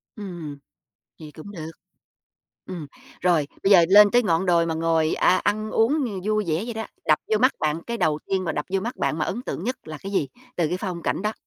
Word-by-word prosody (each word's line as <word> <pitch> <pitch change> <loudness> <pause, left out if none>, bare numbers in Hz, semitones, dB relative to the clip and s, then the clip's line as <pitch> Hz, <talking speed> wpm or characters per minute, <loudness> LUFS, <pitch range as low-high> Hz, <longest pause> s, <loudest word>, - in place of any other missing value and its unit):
Ừm, 175 -8 -7 0.6
vậy 155 -2 -10
cũng 160 +6 -10
được. 160 -3 -7 1.0
Ừm, 175 -5 -6 0.3
rồi, 170 -5 +2 0.2
bây 195 - +3
giờ 175 -4 +8
lên 205 +1 +8
tới 245 - +5
ngọn 175 -3 +1
đồi 170 -1 +3
mà 165 - -1
ngồi, 160 -1 +1
a, 185 - +4
ăn 215 +1 -1
uống, 270 +7 +2
ừ, 200 -6 -4
vui 215 0 +1
vẻ 160 +5 0
vậy 235 -1 -5
đó, 220 - -4 0.2
đập 155 - +4
vô 215 - +4
mắt 255 +3 +4
bạn 155 +2 -1
cái 235 0 -3
đầu 155 -4 +1
tiên 190 -1 -1
mà - - -1
đập 150 - -3
vô 190 - +2
mắt 235 +5 -4
bạn 155 - -1
mà 155 - +1
ấn 240 +6 -4
tượng 180 - -5
nhất 255 +3 -2
là 155 -1 -7
cái 195 +1 -7
gì 150 -8 0 0.3
từ 165 -3 +1
cái 180 - -1
phong 180 -4 -4
cảnh - - -1
đó? 215 0 0
185 Hz, 240 wpm, -24 LUFS, 160-215 Hz, 1.0 s, giờ